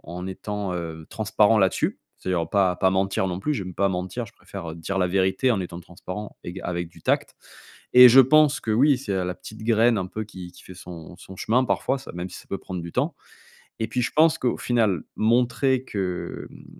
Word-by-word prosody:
en 90 +1 -7
étant, 100 0 -4
heu, 80 -2 -6
transparent 110 0 +3
là-dessus. 95 -2 +1 0.2
C'est-à-dire 90 -3 -1
pas 95 -3 +2
pas 95 - +3
mentir 95 0 0
non 90 0 -3
plus, 150 - -1
j'aime 95 -7 -5
pas 100 0 +2
mentir, 95 +5 -3
je - - -16
préfère, 85 - -8
heu, - - -7
dire 95 +4 -3
la 90 - +2
vérité 95 +6 +1
en 110 -5 +1
étant 85 -1 -6
transparent 90 +4 -8
éga 90 +2 -7
avec 85 -1 -3
du - - -19
tact. - - 0 0.6
Et 125 0 +12
je 125 +3 +6
pense 150 +3 +5
que 110 - -4
oui, 135 +3 +4
c'est 110 -7 -3
a 95 -1 0
la 90 0 -3
petite 110 +4 -11
graine 115 0 +3
un 90 - -2
peu 110 +3 -5
qui 95 -4 -10
qui - - -16
fait 95 - -12
son 85 -1 -10
son 95 +1 -12
chemin, 125 +6 +1
parfois 135 +1 0
ça - - -10
même 90 +1 -4
si - - -9
ça - - -15
peut 100 - -3
prendre 90 -1 -6
du 85 0 -8
temps. - - 0 0.7
Et 110 - -1
puis, 125 - -1
je 120 - -1
pense 160 +1 +5
qu'au 125 - 0
final, 110 -9 +1
montrer 125 +3 +2
que, 95 -3 -4
mmh, - - -15
95 Hz, 225 wpm, -24 LUFS, 90-115 Hz, 0.7 s, Et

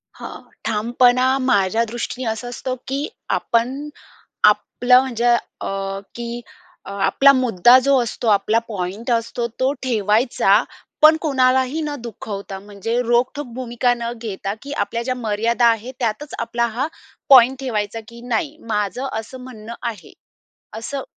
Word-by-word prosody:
हां, - - -9 0.2
ठामपणा 245 +4 +3
माझ्या 220 -3 +2
दृष्टीने 240 +2 -5
असा 220 +2 -4
असतो, 255 +1 -4
की 275 +3 -2 0.2
आपण 260 +6 0 0.5
आपलं 250 0 +4
म्हणजे 240 -3 -2 0.4
अ, 195 0 -3 0.2
की 235 0 -5 0.4
अ, - - -8
आपला 275 +6 +5
मुद्दा 245 -2 +5
जो 275 -1 +4
असतो 230 +1 -5
आपला 215 +2 +3
पॉइंट 200 +2 -5
असतो 235 +1 -1
तो 260 +1 +2
ठेवायचा 220 -2 +2 0.4
पण 310 +1 +8
कोणालाही 260 0 +2
न 300 -1 -3
दुखवता 200 -4 -7
म्हणजे 205 +3 -4
रोखठोक 250 +4 0
भूमिका 245 -1 0
न 235 0 -3
घेता, 200 -3 -4
की 280 - -9
आपल्या 230 -2 -2
ज्या 255 +1 -2
मर्यादा 230 +1 0
आहेत, 230 +2 0
त्यातच 245 +5 -3
आपला 235 0 0
हा 270 +4 +1 0.4
पॉइंट 260 -1 +7
ठेवायचा, 225 -4 -2
की 235 +1 -12
"नाही, 280 +6 -1
माझं 210 +4 -1
असं 230 +4 -9
म्हणणं 230 -3 -9
आहे. 230 -6 -6 0.7
असं 270 +4 -5
235 Hz, 135 wpm, -20 LUFS, 220-255 Hz, 0.7 s, पण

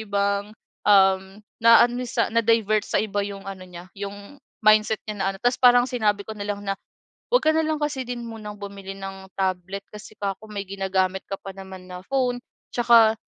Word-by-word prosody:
ibang, 200 0 0 0.4
um, 190 -1 +4 0.2
naano 240 +2 +6
sa 230 - +1
na-divert 225 -2 +3
sa - - +1
iba 205 -1 -1
yung 200 -1 -7
ano 190 -1 -7
niya 175 0 -11
yung 205 +7 -8 0.3
mindset 215 0 +5
niya 210 - -3
na - - +1
ano. - - -10
Tapos 245 +1 +2
parang 245 -1 +7
sinabi 210 -4 +1
ko 220 - -5
nalang 205 0 -3
na, 195 -1 -1 0.6
"'Wag - - +5
ka - - +3
nalang 315 -1 +1
kasi 280 -3 -1
din 245 -1 -5
munang 215 -2 -7
bumili 200 -1 -7
ng 195 0 -8
tablet" 190 +1 -2
kasi 210 +1 -11
'ka 195 -1 -2
ko 220 - -12
"may 205 -1 -4
ginagamit 190 -1 -1
ka 195 - -3
pa 195 - -8
naman 190 -1 -10
na 180 - -6
phone 255 -2 0 0.4
tsaka 235 -2 +6
205 Hz, 185 wpm, -24 LUFS, 195-230 Hz, 0.6 s, parang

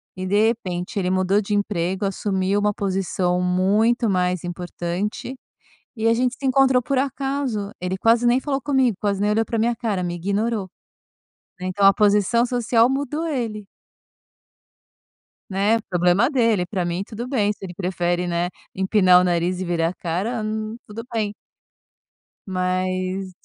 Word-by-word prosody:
E, 185 0 -4
de 210 +3 +3
repente, 185 -3 -3
ele 180 -1 0
mudou 185 +2 +2
de 205 0 -2
emprego, 190 -1 -1
assumiu 195 0 0
uma 210 0 +2
posição 185 -2 -1
muito 205 +7 +2
mais 180 -2 0
importante, 175 +6 -4 0.6
e 225 -1 0
a 230 - +4
gente 250 +1 0
se 275 - -3
encontrou 265 -1 +4
por 275 +2 -2
acaso. 270 -6 -2
Ele 180 +1 -3
quase 230 +3 +3
nem 245 +2 +4
falou 275 -1 -1
comigo, 265 -7 +2
quase 200 -1 -1
nem 210 - +2
olhou 220 +2 +2
pra 230 - -3
minha 235 +1 +1
cara, 215 -6 -2
me 175 -1 -2
ignorou, 200 +3 -1 0.9
né, 185 - -4
então 195 +2 +1
a 195 - +8
posição 210 +3 +3
social 240 -1 +2
mudou 285 +4 -2
ele. 225 -8 -3 1.9
Né, 205 +4 +2
problema 180 +7 +3
dele. 230 -9 +2
Pra 185 -1 -2
mim 175 +2 -2
tudo 235 +3 -6
bem, 210 -6 +1
se 200 - -17
ele 180 -2 -6
prefere, 175 -1 -1
né, 175 +1 0 0.2
empinar 185 -2 +4
o - - +1
nariz 175 +1 0
e 185 - -2
virar 165 -1 0
a 180 - -6
cara, 190 +9 -2
hum, 215 0 -3
tudo 220 +2 -7
bem 210 -2 -1 1.1
mas 185 0 -2
200 Hz, 160 wpm, -22 LUFS, 185-230 Hz, 1.9 s, a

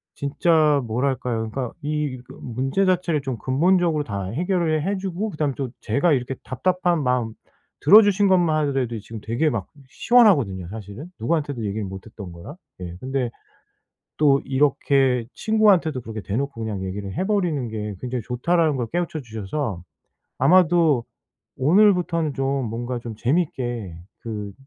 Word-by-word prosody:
진짜 150 0 +2
뭐랄까요. 120 -1 -1
그러니까 125 +1 -4
이 150 -3 -2
그 - - -13
문제 135 +10 -1
자체를 180 -4 +1
좀 130 -3 -4
근본적으로 165 - +2
다 100 -7 -4
해결을 160 - 0
해 200 +1 0
주고 190 +2 -3
그다음에 150 -6 -1
또 135 -3 -3
제가 155 +3 +2
이렇게 130 0 -1
답답한 175 +4 0
마음 125 -3 0 0.5
들어 205 +9 +8
주신 205 -1 +3
것만 175 -4 +3
하더라도 130 -4 -1
지금 110 +1 -9
되게 120 +9 0
막 105 -7 -3 0.2
시원하거든요 140 - +3
사실은. 110 - -9
누구한테도 145 0 -1
얘기를 105 +1 -3
못 95 0 -8
했던 105 -5 -9
거라. 85 - -10 0.3
예. 85 -1 -6
근데 130 0 -2 0.9
또 140 -2 +4
이렇게 135 -2 +2
'친구한테도 205 -10 +3
그렇게 110 -2 -7
대놓고 120 +5 -3
그냥 105 -4 -4
얘기를 95 +1 -5
해 185 - -1
버리는 175 - 0
게 105 -2 -5
굉장히 125 -1 -3
좋다.'라는 155 +4 +1
걸 120 -2 -2
깨우쳐 175 -2 -1
주셔서 110 - -4 0.6
아마도 170 -7 +4 0.5
'오늘부터는 170 -1 +3
좀 135 -1 -1
뭔가 120 +3 -4
좀 115 -2 -7
재밌게 120 - -1 0.3
그 105 -3 -5
135 Hz, 340 characters per minute, -23 LUFS, 115-170 Hz, 0.9 s, 들어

